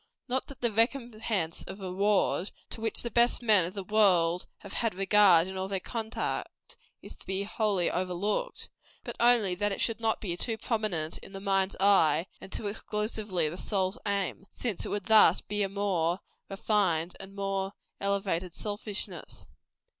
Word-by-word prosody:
Not 260 +1 -1
that 275 - -12
"the 235 -2 +2
recompense 225 -6 0
of 195 - -8
reward," 195 0 +1 0.2
to 225 - -5
which 225 -1 +1
the 235 - -4
best 240 +2 +3
men 210 -6 +5
of 180 +4 -7
the 195 - -4
world 180 -4 +3
have 200 - -9
had 230 -5 0
regard 190 -3 +5
in 190 - -6
all 190 0 -2
their 195 -1 -2
conduct, 225 +2 -5 0.3
is - - -8
to - - -13
be 190 +1 -1
wholly 200 -3 0
overlooked, 185 - -2 0.4
but - - -6
only 235 -5 +4
that 205 +3 0
it 195 - -3
should 230 -2 0
not 225 -1 0
be 175 -5 -3
too 225 +5 0
prominent 210 -9 -1
in 195 - -13
the 195 - -6
mind's 195 -1 0
eye, 175 -5 +4 0.2
and 190 - -11
too - - -4
exclusively 210 -4 -2
the 165 +4 -5
soul's 190 +2 -1
aim; 200 -1 -2
since 225 -7 -3
it - - -5
would 205 -2 -3
thus 220 -1 +6
be 210 0 -4
but - - +3
a 195 - -14
more 180 -3 0 0.3
refined 190 -4 0
and 195 +1 -10
more 195 0 -2 0.3
elevated 195 -3 -1
selfishness. 210 -1 -4
200 Hz, 175 wpm, -29 LUFS, 185-215 Hz, 0.4 s, thus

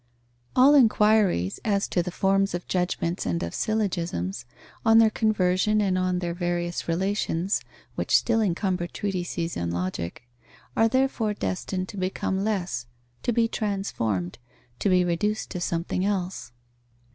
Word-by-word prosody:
_ - - -41 0.5
All 265 +3 +7
enquiries 215 - +4
as 200 -2 +1
to 175 - +1
the 175 - -4
forms 195 +1 +1
of 175 - -5
judgments 180 -1 -1
and 85 -2 -1
of 85 - -4
syllogisms, 170 - -2 0.4
on 225 0 +6
their 225 -1 +6
conversion 210 -1 +2
and 195 -3 +1
on 185 0 +1
their 175 -1 -2
various 175 -1 -2
relations, 190 +1 0 0.3
which - - +1
still 225 -1 +1
encumber 185 -2 0
treatises 175 -3 -3
on 85 0 -2
Logic, 85 +2 -3 0.5
are 225 - +4
therefore 245 -4 +1
destined 185 -1 -3
to 205 - -8
become 190 +1 -1
less, 180 - -2 0.3
to - - 0
be 230 0 +2
transformed, 115 - -2 0.4
to - - +1
be 180 -1 +4
reduced 210 +5 -1
to 180 - -4
something 175 +2 -1
else. 190 -8 -2
185 Hz, 145 wpm, -26 LUFS, 170-210 Hz, 0.5 s, All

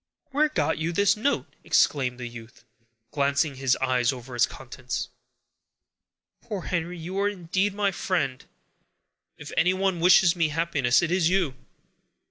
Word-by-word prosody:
"Where 300 +3 +2
got 295 - 0
you 160 +2 -1
this 200 +3 +3
note?" 240 +7 0 0.2
exclaimed 130 -3 +2
the 120 - -5
youth, 115 -1 -12 0.5
glancing 140 +1 +1
his 130 -1 +2
eyes 130 -1 +1
over 125 -1 -9
its 120 - +3
contents. 125 -1 -6 1.3
"Poor 200 -4 -6
Henry, 175 0 -3
you 180 +4 -5
are 200 +1 +2
indeed 190 +1 -1
my 200 -1 +1
friend! 155 -9 -2 0.9
If - - -9
anyone 185 0 +1
wishes 180 0 +5
me 165 -2 +2
happiness, 150 -4 +1
it 170 - -1
is 180 -2 +2
you!" 180 -7 +1
165 Hz, 140 wpm, -26 LUFS, 130-190 Hz, 1.3 s, wishes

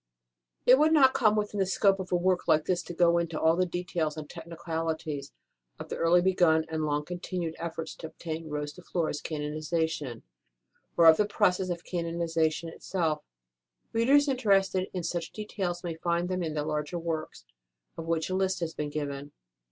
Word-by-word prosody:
It 255 +2 +7
would 310 +1 +5
not 265 -4 +6
come 215 -4 +3
within 210 -1 -1
the 190 - +3
scope 195 +1 +3
of 185 -1 -6
a - - +3
work 180 +1 +1
like 155 0 +4
this 180 -1 +1
to 175 - -8
go 170 0 +4
into 165 -2 -2
all 160 +1 +4
the 185 +1 +1
details 170 -3 -2
and 155 -1 -6
technicali 165 -1 -4
ties 145 -3 -6 0.5
of - - -8
the - - -4
early 175 +1 +4
begun 175 -4 +3
and 160 -1 -1
long 150 0 -1
continued 175 -1 -4
efforts 165 -1 -5
to 160 - -6
obtain 160 0 -6
Rose 150 0 -3
de 180 - -13
Flores 165 -4 -2
canonization, 155 -3 -2 0.7
or 170 - +6
of 160 -1 +9
the 210 - +2
process 190 -3 +1
of 170 -1 -3
canonization 165 -2 -1
itself; 165 -2 -2 0.7
readers 275 +6 +4
interested 195 -7 +2
in 180 -2 -4
such 170 0 -3
details 190 -4 -4
may 170 -2 -3
find 170 +2 -1
them 185 0 -1
in 160 -3 -3
the 150 -1 -1
larger 150 +3 -2
works, 165 - -4 0.5
of 165 - -7
which 165 -1 0
a 185 - -3
list 190 -1 +1
has 165 -1 -2
been 150 -1 -3
given. 145 -1 -4
170 Hz, 185 wpm, -29 LUFS, 160-185 Hz, 0.7 s, of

